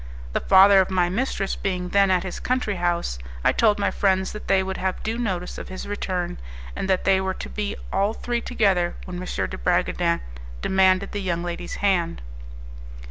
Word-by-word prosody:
The - - +1
father 195 0 +7
of 185 - -1
my 180 -2 +2
mistress 195 -1 -1
being 180 -2 -3
then 200 +1 +4
at 185 -1 +2
his 185 - -5
country 250 -6 -1
house, 170 - -1 0.2
I - - +5
told 215 -2 +3
my 200 - 0
friends 190 -1 +1
that 210 - -8
they 190 -1 +3
would 190 0 -4
have 190 0 -2
due 225 +2 -2
notice 185 -6 -3
of - - -7
his 185 - -7
return, 185 - -3 0.4
and 195 - -3
that 190 -1 +2
they 190 -1 +3
were 190 0 -2
to - - -6
be 210 -1 -3 0.2
all 200 +3 +1
three 240 -1 -2
together 195 -9 +1
when 180 -1 -6
M. 180 - -5
de 95 - -3
Bragadin - - +1 0.4
demanded 190 - +3
the 205 - -3
young 175 -2 -1
lady's 175 0 -5
hand. 175 - +1
190 Hz, 190 wpm, -24 LUFS, 180-200 Hz, 0.4 s, father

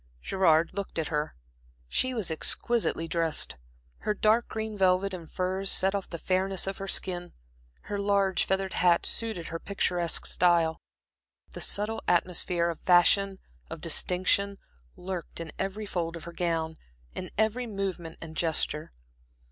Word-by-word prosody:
Gerard 170 -4 +3
looked 200 -2 -5
at 160 -2 -1
her. 150 -1 -2 0.5
She 255 - +1
was 205 -8 -1
exquisitely 165 +1 0
dressed. 165 - 0 0.4
Her 210 - -1
dark 220 +3 +3
green 220 -1 -4
velvet 190 0 +3
and 170 -3 -7
furs 190 +1 -1
set 190 +1 +2
off 200 -1 -3
the 170 - -5
fairness 190 +2 0
of 195 0 -4
her 195 - -4
skin, 180 -2 -1 0.5
her 205 - -4
large 200 -2 +2
feathered 190 0 -1
hat 175 -1 +3
suited 220 -7 0
her 165 - -4
picturesque 180 -3 0
style. 170 -2 +3 0.7
The - - -7
subtle 220 +2 +2
atmosphere 175 -1 +2
of 165 - -9
fashion, 190 +2 +4 0.3
of - - -6
distinction, 195 +2 +1 0.4
lurked 180 -3 -6
in 165 -1 -6
every 195 +3 -2
fold 170 -4 -2
of 165 - -10
her 170 - -8
gown, 165 -2 -1 0.4
in 185 - -5
every 220 +3 +1
movement 190 -6 -4
and 160 -1 -8
gesture. 155 - 0
185 Hz, 150 wpm, -28 LUFS, 170-200 Hz, 0.7 s, fashion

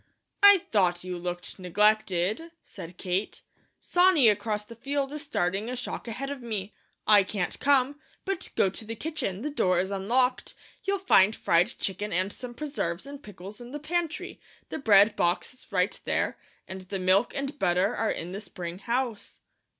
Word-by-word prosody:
"I 405 -3 +8
thought 180 -4 +2
you 185 0 -4
looked 175 +2 -5
neglected," 210 - +1
said 170 +2 -10
Kate. 185 +2 -2 0.4
"Sonny 355 -9 +5
across 210 0 -1
the 230 - -11
field 275 +3 -2
is 300 - -5
starting 205 - -1
a 250 - -3
shock 250 -1 -5
ahead 270 +5 -4
of 280 -2 -6
me; 215 -4 -4 0.3
I 210 -1 +7
can't 190 -2 -3
come, 280 0 +2 0.3
but 390 -2 -2
go 190 - +3
to 210 - -9
the 225 +1 -6
kitchen 255 - -3
the 300 - -2
door 185 -10 +2
is 190 +2 -1
unlocked 240 +6 0 0.3
you'll 395 0 +1
find 220 - +4
fried 170 +2 +2
chicken 205 +2 -2
and 185 +3 0
some 245 -1 -8
preserves 240 - -3
and 280 0 -9
pickles 205 +1 -11
in 240 +2 -10
the 295 - -4
pantry; 345 +3 -3 0.3
the - - -4
bread 210 -3 +6
box 175 +8 0
is 255 - -17
right 185 0 0
there, - - 0 0.3
and 190 0 -7
the 185 +2 -5
milk 190 +5 +2
and 275 +1 -4
butter 185 +5 +2
are 225 - 0
in 170 +2 -3
the 195 +2 -5
spring 175 -3 -7
house." 240 -1 -3
215 Hz, 175 wpm, -27 LUFS, 185-275 Hz, 0.4 s, I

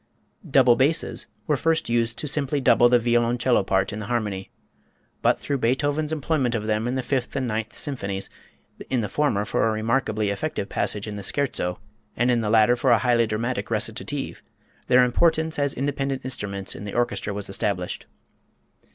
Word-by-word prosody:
Double 130 -3 +5
basses 145 +6 +1 0.3
first 160 +3 0
were 115 - -1
used 115 -1 +1
to 150 - -3
simply 145 0 0
double 120 -2 +5
the 125 - +6
violoncello 120 +1 +2
part 95 +1 0
in 105 - -5
the 105 - -6
harmony. 105 -5 -2 0.7
But - - +3
through 140 -1 -2
Beethoven's 145 +5 0
employment 145 -5 0
of 110 -2 -2
them 110 +1 0
in 125 - -1
the 130 - -1
Fifth 130 0 -2
and 130 -2 -1
Ninth 110 0 -3
Symphonies, 100 -9 -3 0.6
in 125 -3 +1
the 105 - -2
former 125 -9 0
for 110 - +1
a - - +1
remarkably 110 -1 0
effective 100 -2 -3
passage 105 -1 -1
in 105 -1 -5
the - - -5
Scherzo 95 -8 -1 0.4
and 120 +2 +3
in 120 -1 +2
the 105 - -1
latter 110 +2 +5
for 130 +2 0
a 120 - +6
highly 115 0 +2
dramatic 115 +4 -2
recitative, - - -2 0.5
their 125 0 +6
importance 160 +5 +2
as 140 -1 +1
independent 135 -1 -2
instruments 100 -6 -4
in - - -8
the 105 - -6
orchestra 120 -3 -1
was 100 0 -5
established. 95 -2 -2
120 Hz, 175 wpm, -24 LUFS, 105-135 Hz, 0.7 s, the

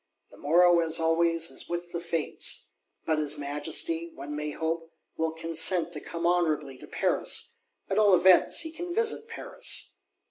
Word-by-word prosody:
The - - -16
morrow, 175 +3 +4
as 165 -1 +1
always, 165 0 +1
is - - -5
with 175 0 -5
the 170 - -3
Fates! 165 - -1 0.3
But 160 -1 +1
his 150 0 0
Majesty, 150 +3 0
one 145 +2 -7
may 150 0 -3
hope, 165 +2 -4 0.2
will 160 0 -1
consent 165 +2 +1
to - - -5
come 170 0 -5
honourably 155 -6 0
to - - -12
Paris; 470 0 -1 0.3
at - - 0
all 205 -3 +6
events, 185 - +5
he 320 -1 -4
can 345 +2 -6
visit 455 0 0
Paris. - - -4
165 Hz, 165 wpm, -27 LUFS, 155-180 Hz, 0.3 s, all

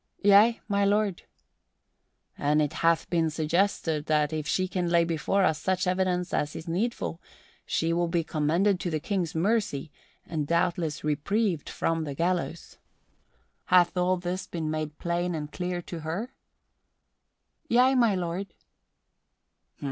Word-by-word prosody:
"Yea, 205 +3 +6
my 200 -1 +1
lord." 205 -2 +1 1.1
"And 150 +1 +1
it 150 -2 0
hath 165 0 +3
been 165 -2 +2
suggested 160 -1 0
that 150 0 +2
if 155 -1 -3
she 185 +3 +1
can 180 -2 -2
lay 170 0 +4
before 170 +4 0
us 160 -4 +2
such 185 0 0
evidence 180 -1 0
as 150 0 -1
is 160 - -7
needful, 180 -1 -2 0.5
she 165 +1 0
will 175 0 +1
be 170 0 0
commended 170 +6 +1
to 180 - -2
the 155 -2 -1
King's 175 -1 -2
mercy 170 -5 0 0.3
and 155 -3 -3
doubtless 170 -2 0
reprieved 165 +4 0
from 165 -1 -1
the 145 -3 -5
gallows. 170 +1 -2 0.9
Hath 180 -1 +4
all 180 +1 +2
this 180 +1 -4
been 160 -3 -3
made 155 -1 -4
plain 175 0 -1
and 150 -1 -5
clear 180 -1 -3
to 170 - -7
her?" 180 +12 -4 1.4
"Yea, 250 +3 +5
my 235 -6 +3
lord." 180 +2 -4
175 Hz, 140 wpm, -27 LUFS, 160-190 Hz, 1.4 s, Yea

